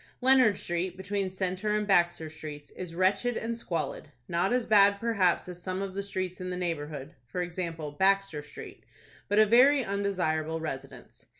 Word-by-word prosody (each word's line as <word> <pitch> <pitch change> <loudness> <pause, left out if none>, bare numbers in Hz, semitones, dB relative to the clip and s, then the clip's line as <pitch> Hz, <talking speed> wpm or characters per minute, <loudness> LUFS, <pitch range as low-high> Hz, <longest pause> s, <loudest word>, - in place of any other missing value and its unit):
Leonard 255 -5 +5
Street, 175 +1 -2
between 195 0 -2
Centre 185 +3 -1
and 210 - -1
Baxter 175 -4 +2
Streets, 150 -2 -9
is 175 -2 -8
wretched 200 +7 +1
and 230 +1 -3
squalid, 165 -10 -4 0.2
not 175 +3 0
as 250 -1 +1
bad 200 -2 +5
perhaps 200 -8 +1
as 180 -1 -9
some 185 +1 -3
of 195 -1 -5
the 200 - -2
streets 185 -2 -4
in 185 - -4
the 180 - -3
neighborhood,—for 150 -5 -5
example, 170 -3 -4
Baxter 190 -1 +2
Street,—but 200 +6 -8
a 215 - +7
very 255 +5 +5
undesirable 175 -6 -1
residence. 135 -4 -8
185 Hz, 160 wpm, -29 LUFS, 165-200 Hz, 0.2 s, a